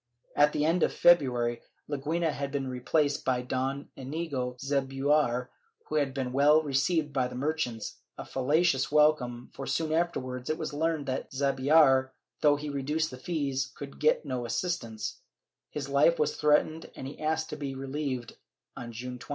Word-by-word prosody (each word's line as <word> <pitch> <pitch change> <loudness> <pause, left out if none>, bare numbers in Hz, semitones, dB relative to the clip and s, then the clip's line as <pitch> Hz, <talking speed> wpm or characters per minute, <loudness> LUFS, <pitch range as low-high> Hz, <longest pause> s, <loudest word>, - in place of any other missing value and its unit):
At 145 +1 +5
the 150 - 0
end 165 +2 +2
of - - +3
February 125 -8 +4 0.3
Leguina 155 +3 -1
had 140 -1 -4
been 135 -1 -2
replaced 145 +3 0
by 125 -1 0
Don 130 +3 -2
liiigo 135 -3 -4
Zubiaur 135 -2 +1 0.4
who 155 - -2
had 140 -2 +1
been 130 -2 -3
well 150 +3 +5
received 150 +2 +1
by 130 -2 +1
the 125 - -9
merchants 130 -5 -2
— - - -52
a - - -6
fallacious 140 +1 +1
welcome 150 -5 +2
for 135 - -6
soon 160 -1 -1
afterwards 130 -7 -1
it 155 - 0
was 155 -2 -4
learned 160 0 0
that 130 -1 -3
Zubiaur, 135 0 +4 0.3
though 145 -1 +5
he 150 +1 -5
reduced 150 +3 -1
the 130 - -9
fees, 140 -4 -2
could 140 -1 -9
get 155 +1 +3
no 130 -3 -3
assistance; 115 - -3 0.5
his 145 -2 -5
life 140 +4 +4
was 150 0 +1
threatened 150 +2 +2
and - - -7
he 135 - -8
asked 160 +1 -1
to - - -3
be 140 -3 -5
relieved 135 -2 -4 0.4
on 120 -1 -7
June 125 +2 -6
20th. - - -13
140 Hz, 170 wpm, -29 LUFS, 130-155 Hz, 0.5 s, At